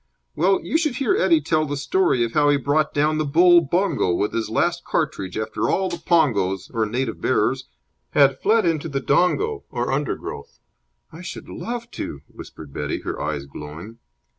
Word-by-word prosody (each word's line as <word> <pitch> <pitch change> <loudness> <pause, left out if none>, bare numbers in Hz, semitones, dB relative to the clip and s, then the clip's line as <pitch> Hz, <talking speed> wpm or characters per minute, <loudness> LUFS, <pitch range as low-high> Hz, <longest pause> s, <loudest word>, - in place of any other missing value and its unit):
Well, 190 +4 +3
you 320 - +1
should 305 -6 0
hear 275 +9 +1
Eddie 340 -8 +3
tell 155 -1 +1
the 145 0 -3
story 150 -4 +1
of 115 - -2
how 145 +1 +3
he 145 - +4
brought 145 +3 +1
down 155 +1 +1
the - - +1
bull 175 +4 +5
bongo 170 - 0
with 105 - -1
his 115 -1 -2
last - - 0
cartridge 95 0 -2
after 110 0 -2
all 190 0 +1
the 170 -1 -5
pongos, 100 - +1
or 110 -2 0
native 120 +1 -3
bearers, - - +1 0.5
had 140 -2 +4
fled 220 +1 +3
into 165 -1 0
the 140 -2 -1
dongo, 290 - +1
or 120 0 -2
undergrowth." 135 - -4 0.5
"I 165 - -11
should 180 - -8
love 235 0 -6
to!" 70 - -6
whispered 75 -3 -12
Betty, 75 0 -3
her - - -5
eyes 75 -2 -3
glowing. 75 +11 -10
145 Hz, 180 wpm, -22 LUFS, 110-180 Hz, 0.5 s, bull